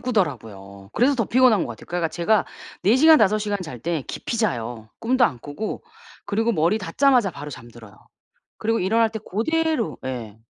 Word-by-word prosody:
꾸더라고요. 110 - -3
그래서 270 +4 +3
더 230 - +1
피곤한 245 -5 +4
거 - - -7
같아요. 115 - -10
그러니까 175 -2 -1
제가 180 +6 +1 0.4
4 220 +6 +5
시간 315 +2 +7
5 215 +1 +3
시간 205 -1 -2
잘 150 -8 -8
때 165 0 -2
깊이 235 - -4
자요. 120 - -2
꿈도 250 +1 +3
안 135 - 0
꾸고 145 - -6 0.4
그리고 225 +3 0
머리 170 +5 +2
닿자마자 230 +3 +2
바로 145 -1 -8
잠들어요. 120 -5 -12 0.6
그리고 225 +1 0
일어날 220 +4 +2
때 220 - -5
고대로 315 - -1
예. 120 -5 -5
195 Hz, 360 characters per minute, -23 LUFS, -, 0.6 s, 시간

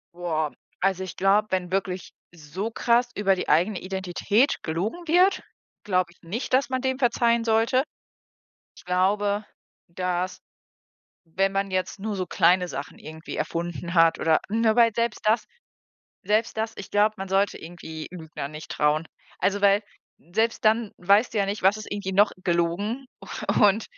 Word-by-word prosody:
Boah. 160 -4 -1 0.3
Also, 190 0 +1
ich 185 - -8
glaube, 200 +3 +3
wenn 185 -1 -1
wirklich 190 -1 -2 0.2
so 175 +7 -5
krass 240 +2 +2
über 195 -2 +2
die - - -4
eigene 180 +5 +3
Identität 190 +6 0
gelogen 205 - -3
wird 360 +4 +4 0.4
glaube 185 -3 +1
ich - - -31
nicht, 205 +12 -4
dass 265 +1 +3
man 260 -1 -1
dem 260 -1 -1
verzeihen 235 -2 +2
sollte. 230 +4 +2 0.9
Ich - - -15
glaube, 200 +3 +1 0.5
dass, 180 +1 -2 0.8
wenn 195 +4 -1
man 195 0 -1
jetzt 185 +2 -2
nur 205 0 -4
so 185 - -2
kleine 180 +1 +3
Sachen 140 -3 -7
irgendwie 160 +1 -8
erfunden 170 0 -3
hat 165 -2 +4
oder 160 -1 +3
Ne? 225 0 +2
weil 235 -1 +5
selbst 230 0 -1
das 220 +1 +2 0.8
selbst 215 +3 0
das 220 +1 -2
ich 195 - -9
glaub, 210 +1 +2
man 195 0 -5
sollte 195 +1 +1
irgendwie 160 -2 -8
Lügner 160 -5 -7
nicht 155 +1 -10
trauen. 150 +2 +1 0.3
Also, 200 +1 +1
weil 200 +1 +4 0.5
selbst 225 +4 0
dann 220 0 +2
weißt 200 +6 +3
du - - +1
ja 200 - +3
nicht, 200 +1 -3
was 190 +3 +4
ist 215 - -9
irgendwie 200 -2 -3
noch 200 +2 +5
gelogen 180 +9 0 0.2
u 210 0 0
und 210 +3 +2
195 Hz, 165 wpm, -25 LUFS, 175-220 Hz, 0.9 s, weil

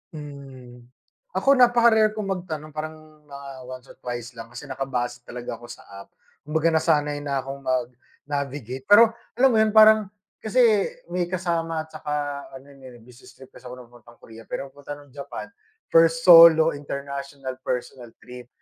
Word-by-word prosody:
Mm, 130 -5 -11 0.5
ako 275 - 0
napaka-rare 235 -3 +4
kong 200 -3 -3
magtanong 160 -5 -5
parang 155 +1 -6 0.3
mga 140 0 -10 0.2
once 130 -1 -9
or - - -18
twice 120 -1 -6
lang 115 - -8
kasi 120 +4 -11
nakabase 125 -3 -4
talaga 120 -1 -7
ako 120 - -13
sa 120 - -11 0.2
app. 100 - -13 0.4
Kumbaga 160 +2 +1
nasanay 150 -2 +1
na 140 -2 -3
akong 135 +1 -7
mag-navigate 130 +1 -5
pero, 225 +2 +7 0.2
alam 265 +1 +4
mo 220 - +2
yun 220 0 +2
parang 215 -1 +7 0.3
kasi 245 +4 +2 0.5
may 180 -1 -1
kasama 170 -3 -2
saka 145 -2 -4
ano 135 +2 -13
may 125 -3 -14
business 125 +2 -17
trip 130 - -16
kasi 125 - -14
ako 125 - -8
na 125 - -12
papuntang 120 0 -19
Korea 115 0 -13
pero 135 0 -6
papunta 145 +1 -9
ng 145 -2 -17
Japan 140 0 -8 0.4
first 165 0 +4
solo 165 -2 +8
international 140 -2 -7
personal 125 -1 -5
trip. 125 -1 -12
140 Hz, 160 wpm, -23 LUFS, 130-165 Hz, 0.5 s, solo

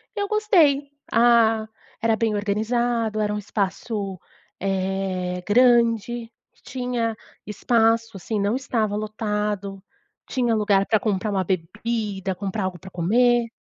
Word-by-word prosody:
eu 405 -1 -1
gostei. 335 -11 +3 0.2
Ah, 225 -2 +4 0.3
era 225 -1 +2
bem 220 -1 0
organizado. 220 +2 0
Era 210 -1 0
um - - -2
espaço, 200 -1 -3 0.4
eh, 190 -1 -2
grande. 235 0 +3 0.3
Tinha 245 -3 -2 0.3
espaço, 225 0 +1
assim, 210 +3 -3
não 205 +4 +1
estava 225 -6 -1
lotado. 210 -2 -3 0.5
Tinha 240 -3 +1
lugar 200 -2 +2
pra 220 -2 +2
comprar 210 -1 -1
uma 190 -1 0
bebida, 195 +2 -2
comprar 200 +1 -3
algo 185 -1 -3
pra 190 - -11
comer. 240 +7 +2
215 Hz, 120 wpm, -23 LUFS, 195-235 Hz, 0.5 s, Ah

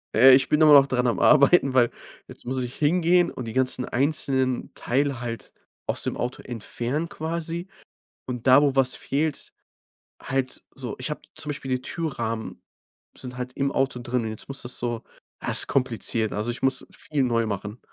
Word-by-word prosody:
Äh, 130 +3 +9
ich 135 - +2
bin 150 +1 +4
aber 150 -1 +8
noch 140 -1 +8
dran 125 -1 +1
am 120 - 0
Arbeiten, 140 -1 +5
weil 120 -2 +4 0.4
jetzt - - -12
muss 130 +1 -2
ich 125 +1 -6
hingehen 170 +3 +3
und 125 - -6
die 115 - -6
ganzen 130 -1 0
einzelnen 130 -2 0
Teile 135 0 0
halt 115 -1 -6 0.4
aus - - 0
dem - - -2
Auto 125 +1 -3
entfernen, 125 +6 -3
quasi. 165 +2 -4 0.6
Und 125 -1 -5
da, 130 +2 +8
wo 140 -2 +2
was 130 -2 +2
fehlt 150 +2 -2 0.7
halt 130 -1 -2
so 125 -5 -5
ich 130 +4 -3
hab 150 - -4 0.2
zum 155 -1 -2
Beispiel 140 -2 -6
die 130 0 0
Türrahmen 115 -9 -4 0.5
sind 125 -1 -8
halt 125 0 -5
im 140 0 -1
Auto 135 -2 0
drin 120 0 -1
und 110 - -3
jetzt 110 - -8
muss 135 - -6
das 120 +1 -6
so 120 -1 -3 0.4
ha, - - -2
ist - - +5
kompliziert. 115 -4 0
Also 105 +3 -2
ich 125 - -10
muss 135 0 0
viel 145 -3 -2
neu 115 -2 +1
machen. 105 +2 -5
130 Hz, 185 wpm, -25 LUFS, 120-145 Hz, 0.7 s, Äh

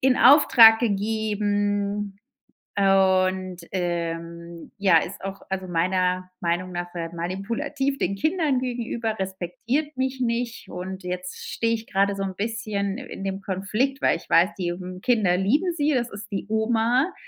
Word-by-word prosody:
in 260 -1 +4
Auftrag 240 -5 +8
gegeben, 205 -2 -1 0.6
und, 190 -1 +2
ähm, 170 -1 -4
ja, 190 -4 +5
ist 190 - -7
auch,- 195 0 -6
also 190 -1 -3
meiner 185 +1 0
Meinung 175 +2 -1
nach- 175 0 -5
sehr 165 -2 -4
manipulativ 235 - -2
den 195 - 0
Kindern 310 - +1
gegenüber, 235 -3 -3
respektiert 195 - -3
mich 260 0 -2
nicht. 235 0 -2
Und 185 +1 -6
jetzt 180 0 -5
stehe 230 0 0
ich 225 0 -8
gerade 200 +1 +1
so 195 - -5
'n 190 -1 -4
bisschen 210 -2 -2
i - - -7
in 195 - -8
dem 195 0 -3
Konflikt, 210 +9 -1
weil - - +3
ich - - -16
weiß, 180 +4 +5
die, 175 -1 -1
hm, 180 0 -8
Kinder 215 -8 +2
lieben 290 - +1
sie. 300 -1 +1
Es 240 -3 0
ist 205 +1 -9
die 195 - -3
Oma. 230 - +1
200 Hz, 155 wpm, -24 LUFS, 185-235 Hz, 0.6 s, Auftrag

